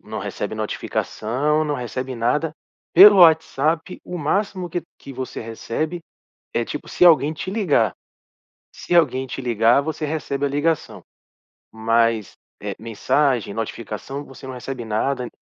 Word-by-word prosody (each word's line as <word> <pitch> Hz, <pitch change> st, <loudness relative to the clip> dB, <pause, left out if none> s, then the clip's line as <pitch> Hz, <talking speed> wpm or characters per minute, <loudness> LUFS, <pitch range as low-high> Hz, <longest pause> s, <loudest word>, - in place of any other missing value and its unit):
não -, -, -7 dB
recebe -, -, -4 dB
notificação, 145 Hz, +8 st, -1 dB
não 150 Hz, -, -1 dB
recebe 130 Hz, 0 st, -4 dB
nada. 135 Hz, +7 st, 0 dB, 0.4 s
Pelo 200 Hz, +3 st, +10 dB
WhatsApp, 160 Hz, +1 st, +3 dB
o 180 Hz, -, -6 dB
máximo 185 Hz, +3 st, -1 dB
que 175 Hz, +1 st, -3 dB, 0.2 s
que 140 Hz, -, -10 dB
você 130 Hz, 0 st, -6 dB
recebe 115 Hz, +9 st, -4 dB, 0.5 s
é 120 Hz, -, +1 dB
tipo 150 Hz, -, -6 dB
se -, -, +1 dB
alguém 155 Hz, -3 st, +5 dB
te 175 Hz, +4 st, -5 dB
ligar. 175 Hz, -, +2 dB, 0.8 s
Se 175 Hz, -, -2 dB
alguém 135 Hz, -6 st, +3 dB
te 130 Hz, -, -6 dB
ligar, 120 Hz, +1 st, +3 dB
você 155 Hz, +1 st, -3 dB
recebe 145 Hz, -2 st, -2 dB
a -, -, 0 dB
ligação. 150 Hz, +3 st, -1 dB, 0.7 s
Mas, 115 Hz, -1 st, +1 dB, 0.3 s
eh, -, -, -4 dB
mensagem, 115 Hz, +1 st, 0 dB
notificação, 115 Hz, +5 st, -5 dB
você 135 Hz, 0 st, -12 dB
não 130 Hz, -, -6 dB
recebe 125 Hz, 0 st, -6 dB
nada. 125 Hz, +4 st, -1 dB
140 Hz, 140 wpm, -22 LUFS, 115-160 Hz, 0.8 s, Pelo